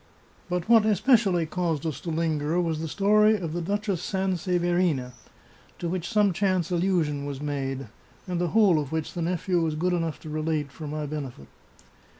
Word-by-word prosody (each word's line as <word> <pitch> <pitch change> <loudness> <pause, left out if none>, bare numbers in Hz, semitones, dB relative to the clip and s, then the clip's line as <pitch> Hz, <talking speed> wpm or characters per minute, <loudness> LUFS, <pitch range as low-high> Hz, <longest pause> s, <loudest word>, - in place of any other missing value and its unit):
But 180 0 -2
what 230 -2 +6
especially 210 -4 +3
caused 165 -2 -2
us 150 -4 -3
to 170 - -5
linger 160 0 0
was 165 -3 0
the 160 - -3
story 210 +5 +4
of 170 -5 -4
the 175 - -2
Duch 205 +5 -2
ess 185 -4 0
Sanseverina, 175 -7 0 0.7
to 175 - -3
which 175 -1 -3
some 210 -4 +3
chance 185 -2 0
allusion 170 -5 +1
was 140 -2 -5
made, 135 -2 -3 0.4
and 175 -1 -2
the 175 - +1
whole 190 -3 +4
of 145 -3 -4
which 160 -1 -3
the 175 - -4
nephew 175 +1 0
was 160 -2 0
good 180 +3 0
enough 165 -3 -1
to 155 - -9
relate, 155 -2 -1
for 155 +1 -8
my 150 +1 -3
benefit. 140 - -6
170 Hz, 180 wpm, -26 LUFS, 155-185 Hz, 0.7 s, what